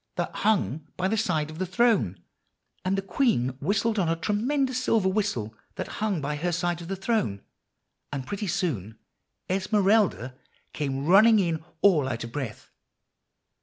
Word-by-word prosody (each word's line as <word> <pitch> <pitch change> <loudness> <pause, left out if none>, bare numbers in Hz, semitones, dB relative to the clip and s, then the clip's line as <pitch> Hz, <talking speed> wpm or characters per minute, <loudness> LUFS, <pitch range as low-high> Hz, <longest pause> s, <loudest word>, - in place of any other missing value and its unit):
that - - -2
hung 160 -8 +1
by 185 - +1
his 220 +2 +1
side 155 -8 -1
of 155 - -10
the 185 - 0
throne; 185 - +2 0.6
and 190 +1 0
the 195 - -1
queen 195 - +1
whistled 215 +2 +1
on 175 -4 +1
a 165 - +2
tremendous 255 - 0
silver 220 -6 +2
whistle 190 - -1 0.2
that - - -4
hung 210 -5 0
by 150 +1 -2
her 175 +4 -1
side 175 0 -1
of 170 - -8
the 195 - -2
throne; 195 - -1 0.7
and 135 -3 -4
pretty 205 +6 -4
soon 125 - -2 0.5
Esmeralda 195 - +2 0.4
came 135 -2 -2
running 215 +6 +7
in 170 -5 0 0.2
all 155 -9 +4
out 120 -2 -3
of 115 - -7
breath. 125 -5 -6
185 Hz, 160 wpm, -26 LUFS, 150-210 Hz, 0.7 s, running